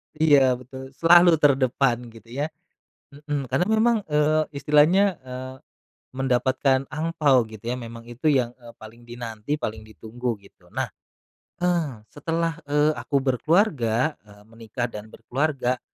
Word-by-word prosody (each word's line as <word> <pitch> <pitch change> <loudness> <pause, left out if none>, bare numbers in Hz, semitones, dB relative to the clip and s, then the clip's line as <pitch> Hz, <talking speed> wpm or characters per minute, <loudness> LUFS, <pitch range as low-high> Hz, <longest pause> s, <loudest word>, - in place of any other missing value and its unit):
Iya, 140 -5 +4
betul. 130 +1 -11
Selalu 175 +3 +6
terdepan 130 -3 +2
gitu 115 0 -15
ya, 145 +4 -2 0.6
mhm. 145 -2 -5
Karena 180 - +2
memang, 220 +1 +3
eee, 150 +1 +2
istilahnya, 150 +7 +4
eee, 130 0 -8 0.6
mendapatkan 130 +1 +1
angpao 155 -4 +2
gitu 110 -1 -12
ya - - -2
memang 115 -1 -9
itu 120 +6 -6
yang, 130 -5 +2
eee, 120 -1 -14
paling 115 +2 -14
dinanti, 120 +2 -5
paling 110 -6 -4
ditunggu 115 +2 -5
gitu. 100 - -21
Nah, - - -3 0.7
eee, 165 -11 -1
setelah, 165 +2 -2
eee, 150 +1 +3
aku 140 - -3
berkeluarga, 140 - +1
eee, 105 -1 -18
menikah 115 +1 -5
dan 105 -2 -9
berkeluarga 130 -2 -2
130 Hz, 130 wpm, -24 LUFS, 120-150 Hz, 0.7 s, Selalu